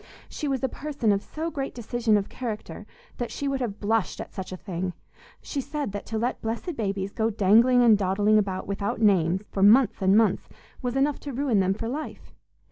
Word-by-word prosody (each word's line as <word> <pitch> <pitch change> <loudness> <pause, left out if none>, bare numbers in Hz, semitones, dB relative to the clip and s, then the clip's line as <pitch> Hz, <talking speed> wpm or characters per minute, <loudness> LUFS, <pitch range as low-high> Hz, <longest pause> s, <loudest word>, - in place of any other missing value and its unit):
She 300 - -4
was 270 -2 -1
a - - +3
person 275 -6 -1
of 200 -1 +1
so 320 +8 -5
great 275 -3 -4
decision 235 -2 +1
of 200 - -2
character 225 -4 -6 0.3
that 240 - -3
she 285 - -4
would 270 -1 -1
have 215 -4 -3
blushed 220 0 0
at - - -7
such 190 -1 -6
a 185 - -5
thing; 180 -1 -4 0.5
she 280 - -3
said 290 -4 -4
that 205 0 -6
to 220 - -3
let 240 +3 -2
blessed 235 +10 -3
babies 200 -3 -2
go 225 +1 0
dangling 230 +4 +5
and 225 -3 +7
dawdling 205 +3 +3
about 190 -2 -2
without 200 +1 -3
names, 190 -4 +3
for 195 - -2
months 215 +3 +5
and 190 +2 +4
months, 220 -4 +2 0.3
was 250 0 -2
enough 280 +1 +1
to 285 - -7
ruin 255 -5 +1
them 190 0 +2
for 225 - -4
life. 295 +6 -6
220 Hz, 210 wpm, -26 LUFS, 200-255 Hz, 0.5 s, and